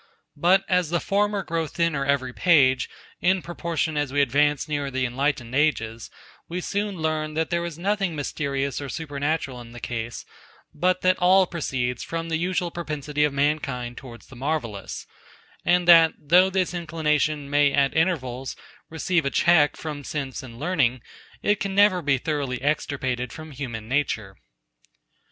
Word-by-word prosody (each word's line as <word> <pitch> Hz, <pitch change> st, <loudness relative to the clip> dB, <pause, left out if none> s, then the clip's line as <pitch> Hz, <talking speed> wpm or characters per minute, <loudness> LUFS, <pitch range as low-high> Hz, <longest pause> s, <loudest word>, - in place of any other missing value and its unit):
But 180 Hz, +6 st, +3 dB
as 180 Hz, -3 st, +2 dB
the 170 Hz, +1 st, +1 dB
former 205 Hz, +1 st, 0 dB
grow 165 Hz, -1 st, -2 dB
thinner 160 Hz, -2 st, 0 dB
every 135 Hz, -2 st, 0 dB
page, 135 Hz, -7 st, +4 dB, 0.3 s
in 185 Hz, 0 st, +2 dB
proportion 170 Hz, -2 st, -2 dB
as 145 Hz, -3 st, -1 dB
we 145 Hz, -, 0 dB
advance 145 Hz, +2 st, +2 dB
nearer 145 Hz, -2 st, -2 dB
the 130 Hz, -1 st, -1 dB
enlightened 125 Hz, -1 st, -1 dB
ages, 115 Hz, -6 st, 0 dB, 0.4 s
we 175 Hz, +2 st, -3 dB
soon 200 Hz, +2 st, -2 dB
learn, 155 Hz, -1 st, -2 dB
that 160 Hz, +1 st, -1 dB
there 170 Hz, 0 st, 0 dB
is 170 Hz, -3 st, -5 dB
nothing 195 Hz, -1 st, 0 dB
mysterious 140 Hz, -2 st, -2 dB
or 140 Hz, -, -5 dB
supernatural 145 Hz, -3 st, -3 dB
in 120 Hz, 0 st, -12 dB
the 120 Hz, -, -9 dB
case, 120 Hz, -1 st, -5 dB, 0.5 s
but 180 Hz, +4 st, +1 dB
that 185 Hz, 0 st, +3 dB
all 185 Hz, +1 st, +5 dB
proceeds 130 Hz, -8 st, -2 dB
from 165 Hz, 0 st, -4 dB
the 160 Hz, -, +1 dB
usual 180 Hz, 0 st, -1 dB
propensity 150 Hz, -3 st, -2 dB
of 150 Hz, -, +3 dB
mankind 140 Hz, -4 st, -1 dB
towards 120 Hz, -3 st, -11 dB
the 135 Hz, -, -14 dB
marvellous, 125 Hz, -6 st, -3 dB, 0.6 s
and 175 Hz, 0 st, +2 dB
that, 165 Hz, -2 st, +8 dB
though 180 Hz, +6 st, +4 dB
this 185 Hz, -2 st, 0 dB
inclination 155 Hz, -3 st, 0 dB
may 145 Hz, 0 st, +3 dB
at 140 Hz, -1 st, +2 dB
intervals 135 Hz, -7 st, 0 dB, 0.3 s
receive 165 Hz, +1 st, 0 dB
a 140 Hz, -, 0 dB
check 160 Hz, -1 st, +4 dB
from 150 Hz, -2 st, -6 dB
sense 140 Hz, -2 st, -4 dB
and 115 Hz, -3 st, -11 dB
learning, 135 Hz, -6 st, 0 dB, 0.4 s
it 205 Hz, 0 st, +2 dB
can 195 Hz, -1 st, -3 dB
never 200 Hz, -3 st, +5 dB
be 145 Hz, -3 st, +2 dB
thoroughly 140 Hz, -3 st, -2 dB
extirpated 130 Hz, -4 st, -1 dB
from 155 Hz, -1 st, -9 dB
human 120 Hz, -6 st, -6 dB
nature. 115 Hz, -7 st, -1 dB
150 Hz, 160 wpm, -24 LUFS, 135-170 Hz, 0.6 s, that